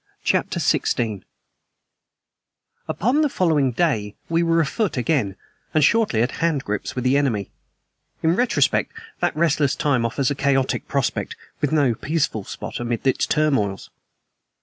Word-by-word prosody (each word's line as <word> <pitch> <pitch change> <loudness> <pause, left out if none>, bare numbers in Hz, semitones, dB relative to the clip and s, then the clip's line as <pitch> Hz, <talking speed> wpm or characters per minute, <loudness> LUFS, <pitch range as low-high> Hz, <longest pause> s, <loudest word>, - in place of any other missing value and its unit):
CHAPTER - - 0
XVI 110 -5 0 1.7
UPON 250 - +1
the 300 - +2
following 155 - +2
day 115 -8 0
we 165 0 +2
were 165 0 +2
afoot 165 - 0
again, 125 -7 0 0.4
and 155 - +4
shortly 180 - +3
at 120 - -1
handgrips 140 -11 -1
with 125 - -2
the 130 +2 +3
enemy. 115 -9 0 0.7
In 165 +2 +3
retrospect, 245 +4 +1 0.3
that - - 0
restless 150 -3 +2
time 135 -5 +1
offers 125 +4 0
a - - +2
chaotic 135 -1 0
prospect, - - -1 0.3
with 145 - +1
no 145 -6 +3
peaceful 145 -4 -1
spot - - -7
amid 120 0 -3
its 130 - +2
turmoils. 135 -11 0
140 Hz, 135 wpm, -22 LUFS, 120-165 Hz, 1.7 s, and